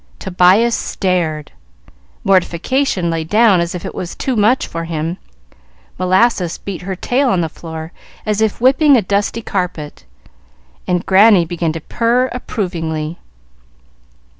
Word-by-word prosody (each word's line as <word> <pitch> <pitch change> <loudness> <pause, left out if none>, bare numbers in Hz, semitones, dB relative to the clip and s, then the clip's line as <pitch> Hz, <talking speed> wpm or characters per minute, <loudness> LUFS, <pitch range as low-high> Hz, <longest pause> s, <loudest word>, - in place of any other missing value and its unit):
Tobias 190 +5 +3
stared, 170 -9 -2 0.7
Mortification 185 +2 +1
lay 165 -1 -2
down 210 +2 +4
as 170 +1 -3
if 180 - -6
it - - -5
was 175 - -6
too 260 - -2
much 225 +4 +2
for 165 0 -5
him, 165 +2 -4 0.8
Molasses 185 -1 +2
beat 195 -3 -7
her 190 +1 -4
tail 255 +8 0
on 185 -6 +1
the 165 - -1
floor 160 0 -8 0.3
as 215 0 -1
if 220 -2 0
whipping 275 +3 +5
a 220 - +1
dusty 205 +4 -1
carpet, 175 -7 -4 0.8
and 180 -1 0
Granny 195 -2 +5
began 165 -1 -2
to 165 - -6
purr 240 +8 0
approvingly. 170 -9 -4
185 Hz, 135 wpm, -16 LUFS, 170-225 Hz, 0.8 s, whipping